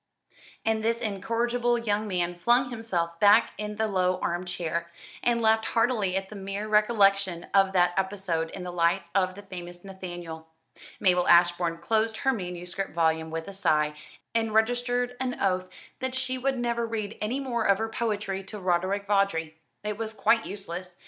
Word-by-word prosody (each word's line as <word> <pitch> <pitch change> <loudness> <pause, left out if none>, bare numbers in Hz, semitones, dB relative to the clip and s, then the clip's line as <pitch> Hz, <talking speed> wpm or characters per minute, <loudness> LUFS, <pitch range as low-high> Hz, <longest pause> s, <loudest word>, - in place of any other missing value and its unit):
And 220 0 +1
this 230 +1 +1
incorrigible 235 +4 0
young 215 -2 -1
man 175 -3 0
flung 240 +8 +2
himself 175 -8 -2
back 210 +3 +6
in 210 0 -4
the 220 +1 0
low 185 -2 +1
arm 175 +1 -2
chair, 170 -1 -3 0.3
and 235 -1 +1
laughed 220 0 +4
heartily 225 -6 +1
at 195 0 -4
the 215 - -9
mere 195 +2 -4
recollection 200 -4 +3
of 195 -1 +5
that 175 -1 +4
episode 190 -4 -1
in 185 - -7
the 180 - -5
life 170 -1 +2
of 185 -1 +1
the 205 - -10
famous 175 -1 -9
Nathaniel. 175 -4 -7 0.5
Mabel 180 -1 +3
Ashbourne 175 -1 +4
closed 220 +5 0
her 265 - +1
manuscript 180 -3 -4
volume 160 -1 +1
with 160 0 -4
a 200 - -7
sigh, 150 -6 +2 0.4
and 225 -1 0
registered 245 +2 +1
an 255 -1 -2
oath 185 -1 +1 0.3
that 260 0 -3
she 260 0 -1
would 265 +1 -1
never 235 -1 0
read 215 -2 -3
any 230 +6 -1
more 240 -5 -1
of 200 -1 +4
her 225 +1 -1
poetry 210 -4 -2
to 210 +2 -7
Roderick 185 +2 0
Vawdrey. 195 -6 +1 0.3
It 210 0 -3
was 220 -1 -3
quite 225 +2 +2
useless. 185 -2 -7
200 Hz, 170 wpm, -27 LUFS, 180-225 Hz, 0.5 s, back